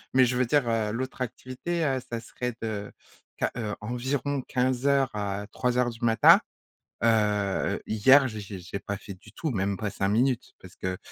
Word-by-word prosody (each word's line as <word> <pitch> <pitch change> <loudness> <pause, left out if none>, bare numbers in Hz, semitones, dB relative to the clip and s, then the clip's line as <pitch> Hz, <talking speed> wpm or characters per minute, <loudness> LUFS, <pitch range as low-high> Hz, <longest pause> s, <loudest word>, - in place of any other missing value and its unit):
mais 130 - +7
je 125 +1 0
veux 130 - +3
dire, 140 -1 +2
heu, 110 -2 0
l'autre 130 +3 -4
activité, 130 +7 -3
heu, 135 -2 +1
ça 115 - -3
serait 125 +1 -5
de, 105 -2 -4 0.5
quin - - 0
heu 110 -2 -3
environ 130 +4 -2
15:00 130 +2 +1
à 100 -1 -3
03:00 125 -1 +1
du 115 +1 -11
matin. 115 -1 +7 0.6
Heu, - - +5
heu, 105 -3 +1
hier, 130 +6 +6
j'ai 110 -3 -6
j'ai 100 -2 -7
j'ai 90 +3 -6
pas 100 +1 -4
fait 100 - -9
du 95 - -16
tout, 160 - -3
même 100 -2 -1
pas 105 - -2
5 100 0 -1
minutes, 125 +3 +1
parce 95 -1 -13
que, 95 0 -3
115 Hz, 190 wpm, -27 LUFS, 105-130 Hz, 0.6 s, mais